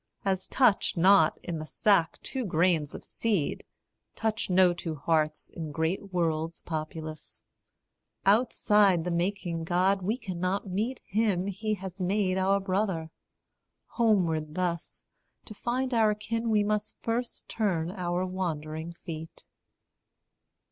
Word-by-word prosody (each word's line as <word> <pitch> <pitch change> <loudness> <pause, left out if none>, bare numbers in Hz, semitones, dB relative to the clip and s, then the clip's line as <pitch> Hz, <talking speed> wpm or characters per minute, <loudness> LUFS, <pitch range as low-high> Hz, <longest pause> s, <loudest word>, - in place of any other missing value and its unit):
As 190 -1 0
touch 240 -8 +3
not 180 -2 +5
in 170 -3 -4
the 155 - -5
sack 195 -6 +2
two 265 -1 -3
grains 170 -5 +1
of - - -8
seed, 205 -10 -1 0.5
Touch 220 -2 -1
no 180 -1 +5
two 170 -2 -4
hearts 155 0 0
in 160 -2 -6
great 165 +6 -2
worlds 165 -2 -1
populous. 155 -1 -5 0.8
Outside 210 -4 +4
the 180 - -2
making 170 -1 -1
God 185 +3 +2
we 210 +6 0
cannot 185 -2 -2
meet 215 +8 -2
Him 200 -3 +1
he 215 +2 -2
has 190 -1 -8
made 190 0 +1
our 195 +1 +3
brother: 190 -4 -1 0.8
homeward, 170 -9 +1
thus, 175 -2 -3 0.4
To 215 - -8
find 250 +4 -2
our 220 -2 +4
kin 225 +2 -2
we 215 -1 +4
first - - -2 0.4
must 235 +1 -2
turn 180 -7 0
our 180 -1 -1
wandering 165 -3 -3
feet. 165 -2 -8
185 Hz, 125 wpm, -28 LUFS, 165-210 Hz, 0.8 s, not